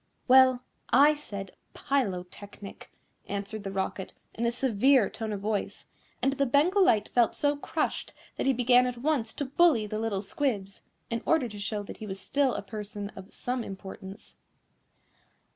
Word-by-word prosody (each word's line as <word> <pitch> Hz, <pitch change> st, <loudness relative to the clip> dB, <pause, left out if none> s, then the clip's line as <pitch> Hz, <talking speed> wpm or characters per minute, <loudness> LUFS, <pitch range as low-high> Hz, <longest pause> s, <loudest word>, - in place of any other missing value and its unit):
"Well, 260 Hz, -1 st, +6 dB, 0.3 s
I 285 Hz, +5 st, +6 dB
said 200 Hz, -10 st, -8 dB, 0.2 s
Pylotechnic," 200 Hz, -5 st, -4 dB, 0.4 s
answered 200 Hz, +1 st, -4 dB
the 195 Hz, -, -4 dB
Rocket, 190 Hz, 0 st, -3 dB, 0.2 s
in 235 Hz, +1 st, -1 dB
a -, -, +2 dB
severe 250 Hz, -1 st, +3 dB
tone 220 Hz, -1 st, -4 dB
of 200 Hz, -2 st, -4 dB
voice, 210 Hz, 0 st, -3 dB, 0.4 s
and 270 Hz, -, +3 dB
the 275 Hz, 0 st, +1 dB
Bengal 340 Hz, +10 st, +4 dB
Light 215 Hz, -, +3 dB
felt 240 Hz, -2 st, +3 dB
so 290 Hz, 0 st, +1 dB
crushed 285 Hz, -, -2 dB, 0.2 s
that -, -, -2 dB
he -, -, +5 dB
began 250 Hz, 0 st, +4 dB
at 250 Hz, -1 st, -4 dB
once 250 Hz, -4 st, 0 dB
to 285 Hz, -, -2 dB
bully 280 Hz, -4 st, +3 dB
the 215 Hz, +1 st, -4 dB
little 215 Hz, -3 st, -2 dB
squibs, 200 Hz, -3 st, -2 dB, 0.3 s
in 230 Hz, 0 st, -1 dB
order 320 Hz, -6 st, +2 dB
to 205 Hz, -1 st, -9 dB
show 205 Hz, 0 st, -3 dB
that -, -, -9 dB
he 215 Hz, -, -8 dB
was 190 Hz, -1 st, -5 dB
still 270 Hz, +5 st, +1 dB
a -, -, -4 dB
person 205 Hz, 0 st, -6 dB
of 190 Hz, +2 st, -11 dB
some 250 Hz, -1 st, -3 dB
importance. 195 Hz, +1 st, -10 dB
225 Hz, 165 wpm, -28 LUFS, 200-265 Hz, 0.4 s, Well